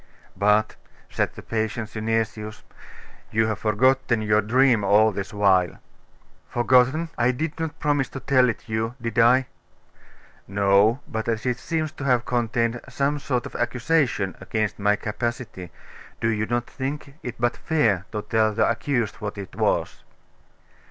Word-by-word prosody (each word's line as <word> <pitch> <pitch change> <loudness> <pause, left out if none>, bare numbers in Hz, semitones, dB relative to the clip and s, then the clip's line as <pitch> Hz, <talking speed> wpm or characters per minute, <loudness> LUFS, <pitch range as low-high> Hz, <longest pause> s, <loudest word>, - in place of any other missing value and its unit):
'But,' 105 +1 +2 0.3
said - - -1
the - - -10
patient 110 0 -2
Synesius 110 -1 -3 0.7
'you 110 +1 +2
have 110 -1 -2
forgotten 120 +1 +2
your 105 0 +3
dream 120 0 +3
all 105 +2 +5
this 95 -1 -5
while. 95 -4 +2 0.7
'Forgotten! 130 +6 +3
I 120 +1 +3
did 150 +5 -2
not 160 -1 -4
promise 145 -5 +1
to 135 - -7
tell 130 -2 +3
it 115 - -5
you 110 +1 -2
did 115 -1 -2
I?' 125 +3 +5 1.0
'No; 100 +5 +3
but 110 0 -4
as 115 -1 -1
it 125 -1 0
seems 160 -2 -2
to 155 - -9
have 125 -3 +2
contained 120 -1 0
some 145 +1 0
sort 125 -3 -2
of - - -9
accusation 120 - 0
against 110 +1 -2
my 105 +1 +3
capacity, 110 -4 -4 0.5
do 115 - +1
you 110 -1 -1
not 120 +1 -1
think 140 +2 -6
it 125 -1 -6
but 120 +1 +1
fair 115 - +1
to 105 -2 -4
tell 110 -1 +1
the - - +3
accused 115 -2 -1
what 105 -1 -5
it 100 -2 -8
was? - - -1
115 Hz, 150 wpm, -24 LUFS, 105-130 Hz, 1.0 s, all